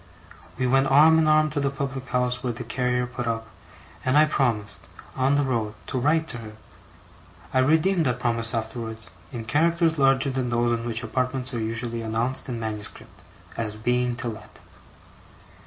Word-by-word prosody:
We 130 - 0
went 135 +2 +3
arm 155 +4 +6
in 160 - +3
arm 155 0 +4
to 150 - -1
the 140 -1 +1
public 135 -1 -4
house 125 +1 0
where 125 -2 -1
the 120 +2 -6
carrier 125 +1 0
put 125 -1 -5
up, 115 -1 -2 0.6
and 130 +2 +2
I 155 - +7
promised, 105 - -1 0.3
on 135 +2 +2
the 145 - +2
road, 115 -5 -1
to 130 - -2
write 160 +5 +2
to 120 - -4
her. 110 -2 -9 1.0
(I 130 - +3
redeemed 160 +4 +3
that 125 0 -1
promise 115 -1 0
afterwards, 110 0 -5 0.2
in 120 -4 -6
characters 165 +4 +2
larger 135 0 +4
than 130 -2 -2
those 120 0 +1
in 115 0 -1
which 115 -1 -1
apartments 130 0 -2
are 120 - -2
usually 115 +1 -3
announced 115 +4 -2
in 120 -2 -3
manuscript, 110 -2 -7 0.4
as 110 -2 -3
being 125 +2 0
to 120 0 -4
let.) 110 -1 -10
125 Hz, 175 wpm, -25 LUFS, 115-135 Hz, 1.0 s, I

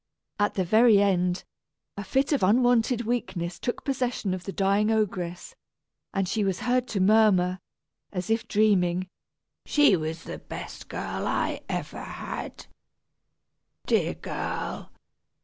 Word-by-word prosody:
At 205 - +1
the 190 - +1
very 220 +3 +5
end, 180 -2 +1 0.5
a 200 - -5
fit 270 +8 0
of 280 - +1
unwonted 240 +3 +3
weakness 190 -7 -2
took 245 - -3
possession 250 -7 -1
of 185 -1 -5
the 195 - -4
dying 200 +2 +2
ogress, 185 -5 -1 0.6
and 195 -1 -1
she 210 +3 0
was 195 +2 -1
heard 250 +1 +1
to 200 - -2
murmur, 190 -3 +4 0.5
as 180 +1 -3
if 225 0 0
dreaming, 185 -4 +2 0.5
"She 295 -9 +4
was 160 0 -4
the - - -7
best - - -9
I - - -2
ever - - -4
had. - - -7 1.2
Dear - - +1
girl! - - -5
200 Hz, 130 wpm, -26 LUFS, 185-230 Hz, 1.2 s, very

